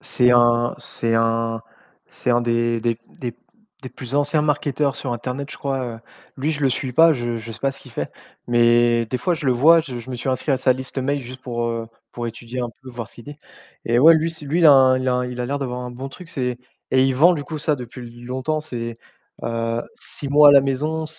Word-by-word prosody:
C'est 125 -1 +3
un 120 0 +4
c'est 115 -1 -2
un 115 0 +1 0.5
c'est 125 - -2
un 120 0 +3
des 115 -1 0
des 115 0 -1 0.2
des 120 -2 -5 0.5
des 130 - -6
plus 130 +1 -8
anciens 145 +1 +2
marketeurs 145 -1 0
sur 130 -4 -4
internet, 130 +4 -5
je - - -8
crois, 135 -2 -2 0.2
heu, - - -13 0.4
lui, 145 +4 -1
je 150 - -5
le 140 - +3
suis 130 0 -3
pas, 165 +5 +6
je 120 -3 -2
je 115 0 -8
sais 115 - -8
pas 135 +2 0
ce 140 - -12
qu'il 130 - -14
fait, 75 -11 -4 0.4
mais 120 0 +3
des 125 +3 -3
fois 175 +8 0
je 155 - -7
le - - +4
vois, 160 +7 +6
je 135 -6 -7
je 120 +2 -10
me - - -4
suis 120 +3 -5
inscrit 130 +3 0
à - - +3
sa 130 - +3
liste 130 +1 -6
mail 140 +2 -1
juste 130 +1 -10
pour, 120 -2 -3
heu, 115 -1 -4 0.2
pour 120 -1 -4
étudier 120 +2 -7
un 120 - -2
peu, 130 - -10
voir 120 -4 -7
ce - - -20
qu'il 120 - -12
dit 145 0 -9 0.5
et 120 +1 +2
ouais, 160 +6 +8
lui 160 +1 +1
s 160 - -10
lui, 150 +5 -1
il 165 - +7
a 130 -3 +7 0.3
il 125 0 -5
a 125 - -2
l'air 140 +2 -2
d'avoir 125 -2 -4
un 125 0 -6
bon 130 +3 -7
truc, 175 +5 -12
c'est 125 -5 -3 0.3
et 130 - +5
il 135 - +2
vend 165 +8 +6
du 150 - -4
coup 155 0 -6
ça 150 0 +1
depuis 125 -1 -9 0.2
longtemps, 130 +5 -2
c'est 115 -6 -6 0.4
heu, 115 0 -2
6 140 - -4
mois 145 +1 +8
à - - +6
la 140 - +8
maison, 150 +4 -1
130 Hz, 245 wpm, -21 LUFS, 120-140 Hz, 0.5 s, ouais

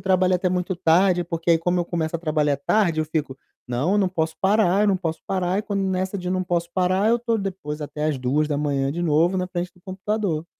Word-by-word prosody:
trabalho 185 0 +2
até 185 +1 0
muito 180 +1 -1
tarde, 175 +1 +3
porque 165 0 -2
aí 165 - +5
como 175 +1 0
eu - - -1
começo 170 -1 -3
a - - -10
trabalhar 155 -3 +1
tarde 165 +2 +1
eu - - 0
fico: 150 -4 -3 0.3
"Não, 140 +12 0
não 190 -2 +2
posso 160 -3 -2
parar, 195 -1 +3
eu - - +3
não 195 - +3
posso 165 -3 -4
parar", 185 0 0
e - - -1
quando 200 -3 -2
nessa 190 +1 -1
de: 180 -1 -4
"Não 185 0 0
posso 170 -1 -1
parar", 185 +3 +2
eu 235 - +3
tô 230 -1 0
depois 185 -7 -5
até 150 +1 -4
às 155 -2 0
2:00 145 +1 0
de 170 +3 -3
novo 170 +3 +2
na 185 - -1
frente 180 0 -4
do 180 - -23
computador. 190 -4 -2
175 Hz, 230 wpm, -23 LUFS, 160-190 Hz, 0.3 s, aí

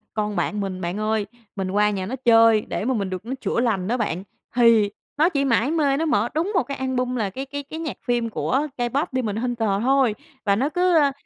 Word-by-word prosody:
Con 210 -1 -1
bạn 210 - -1
mình, 190 -2 -4
bạn 175 +2 -3
ơi, 215 -1 0 0.3
mình 190 -2 -3
qua 210 +1 +3
nhà 195 -3 -2
nó 240 +7 -4
chơi 225 -2 +6
để 210 - -4
mà 260 - +1
mình 200 -5 -1
được 185 +3 -5
nó 250 - -3
chữa - - 0
lành 220 -7 0
đó 240 +4 0
bạn. 190 -6 -2 0.3
Thì 230 -4 +5 0.3
nó 315 +4 +4
chỉ 280 -5 0
mải 250 +2 +2
mê 285 -4 +2
nó 325 - 0
mở 240 -7 +1
đúng 340 +6 0
một 360 - +3
cái 280 +2 -6
album, 255 -1 -1
là 215 -5 -1
cái 265 +8 -6
cái 285 +1 -6
cái 315 +3 -8
nhạc 315 -5 -4
phim 240 -1 +1
của 270 +6 0
K-pop 260 +5 0
Demon 240 -6 -1
Hunter 230 -2 -1
thôi. 260 -3 +3 0.3
Và 200 -1 +3
nó 265 +8 +1
cứ, 360 +1 +2
ơ, 285 -3 +4
240 Hz, 240 wpm, -23 LUFS, 210-275 Hz, 0.3 s, chơi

